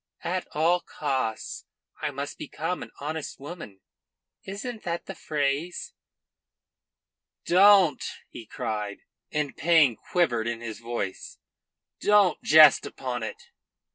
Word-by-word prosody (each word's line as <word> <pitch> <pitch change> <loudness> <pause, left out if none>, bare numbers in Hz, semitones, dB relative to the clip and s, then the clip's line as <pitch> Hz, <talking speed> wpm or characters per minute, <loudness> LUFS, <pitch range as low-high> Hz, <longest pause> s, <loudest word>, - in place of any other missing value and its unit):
At 180 +2 -2
all 165 +4 +3
costs 135 -9 -3 0.3
I - - 0
must 145 0 -6
become 165 +4 -4
an - - -7
honest 155 +1 -5
woman. 140 - -9 0.6
Isn't 215 +4 -6
that 170 -1 -4
the 195 - -6
phrase?" 155 - -2 1.5
"Don't!" 185 -5 +6 0.2
he 115 - -11
cried, 110 -6 -4 0.3
and 150 -2 -2
pain 155 -6 +4
quivered 120 - 0
in 120 -1 -2
his 115 -2 -7
voice. 115 -5 -5 0.6
"Don't 205 -5 +4
jest 155 -2 +7
upon 125 -2 -5
it." 110 - -7
150 Hz, 110 wpm, -26 LUFS, 120-175 Hz, 1.5 s, jest